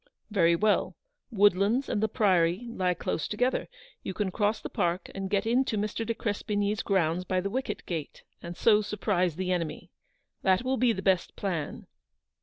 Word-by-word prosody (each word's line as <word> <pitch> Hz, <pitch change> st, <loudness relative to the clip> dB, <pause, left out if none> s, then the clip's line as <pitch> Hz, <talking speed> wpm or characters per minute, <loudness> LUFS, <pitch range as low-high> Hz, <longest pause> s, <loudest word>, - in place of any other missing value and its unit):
"Very 170 Hz, -5 st, +4 dB
well; 210 Hz, +4 st, +1 dB, 0.3 s
Woodlands 205 Hz, +3 st, +3 dB
and 205 Hz, -, -1 dB
the 220 Hz, -, +3 dB
Priory 185 Hz, -1 st, +2 dB
lie 185 Hz, -5 st, 0 dB
close 160 Hz, -, -2 dB
together. 250 Hz, +5 st, 0 dB, 0.3 s
You 190 Hz, -, -5 dB
can 205 Hz, -3 st, -1 dB
cross 210 Hz, +3 st, 0 dB
the -, -, -6 dB
park 175 Hz, +2 st, -1 dB
and 195 Hz, -1 st, -4 dB
get 200 Hz, +1 st, +1 dB
into 235 Hz, -1 st, +1 dB
Mr. 210 Hz, +2 st, -2 dB
de 230 Hz, +1 st, -2 dB
Crespigny's 205 Hz, -1 st, -1 dB
grounds 180 Hz, -3 st, +1 dB
by 185 Hz, 0 st, 0 dB
the 195 Hz, +2 st, -3 dB
wicket 260 Hz, +3 st, -3 dB
gate, 160 Hz, -5 st, -5 dB, 0.2 s
and 170 Hz, 0 st, -7 dB
so 215 Hz, -2 st, +5 dB
surprise 200 Hz, -5 st, 0 dB
the 185 Hz, +1 st, -2 dB
enemy. 170 Hz, -4 st, -3 dB, 0.5 s
That 190 Hz, +3 st, +3 dB
will 260 Hz, +1 st, 0 dB
be 250 Hz, -2 st, +3 dB
the 190 Hz, -3 st, -4 dB
best 190 Hz, -3 st, +1 dB
plan." 170 Hz, -7 st, -3 dB
200 Hz, 175 wpm, -28 LUFS, 180-215 Hz, 0.5 s, so